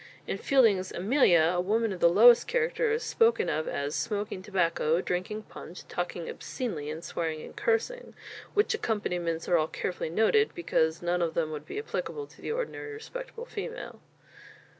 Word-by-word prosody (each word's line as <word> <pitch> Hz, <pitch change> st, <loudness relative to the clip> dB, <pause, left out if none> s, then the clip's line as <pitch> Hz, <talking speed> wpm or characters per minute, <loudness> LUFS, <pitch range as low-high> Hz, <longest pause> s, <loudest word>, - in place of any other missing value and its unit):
In -, -, -3 dB
Fielding's 220 Hz, -9 st, +3 dB
"Amelia," 175 Hz, -, +4 dB
a 180 Hz, -, +1 dB
woman 220 Hz, +3 st, +1 dB
of 180 Hz, -, -7 dB
the 170 Hz, -, +6 dB
lowest 230 Hz, +7 st, +7 dB
character 485 Hz, -1 st, +1 dB
is 455 Hz, +2 st, 0 dB
spoken 460 Hz, 0 st, +2 dB
of 155 Hz, +1 st, -1 dB
as 140 Hz, +1 st, -2 dB
"smoking 200 Hz, +7 st, -2 dB
tobacco, 170 Hz, -4 st, +1 dB
drinking 185 Hz, +4 st, -3 dB
punch, 180 Hz, -3 st, -11 dB
talking 175 Hz, -1 st, -4 dB
obscenely 165 Hz, -, -4 dB
and 160 Hz, +2 st, -6 dB
swearing 160 Hz, -3 st, -3 dB
and -, -, -11 dB
cursing" -, -, -1 dB, 0.4 s
which 415 Hz, +2 st, +3 dB
accomplishments 180 Hz, -, -2 dB
are 175 Hz, -, +4 dB
all 155 Hz, -, +1 dB
carefully 180 Hz, -1 st, -3 dB
noted, 225 Hz, -, +3 dB
because 160 Hz, -, 0 dB
none 175 Hz, +1 st, +1 dB
of 165 Hz, -1 st, -1 dB
them 160 Hz, -2 st, 0 dB
would 150 Hz, -1 st, -7 dB
be -, -, -6 dB
applicable 440 Hz, 0 st, -4 dB
to -, -, -19 dB
the -, -, -4 dB
ordinary 455 Hz, -2 st, -4 dB
respectable 475 Hz, +2 st, -8 dB
female. 475 Hz, +1 st, -6 dB
195 Hz, 165 wpm, -29 LUFS, -, 0.4 s, lowest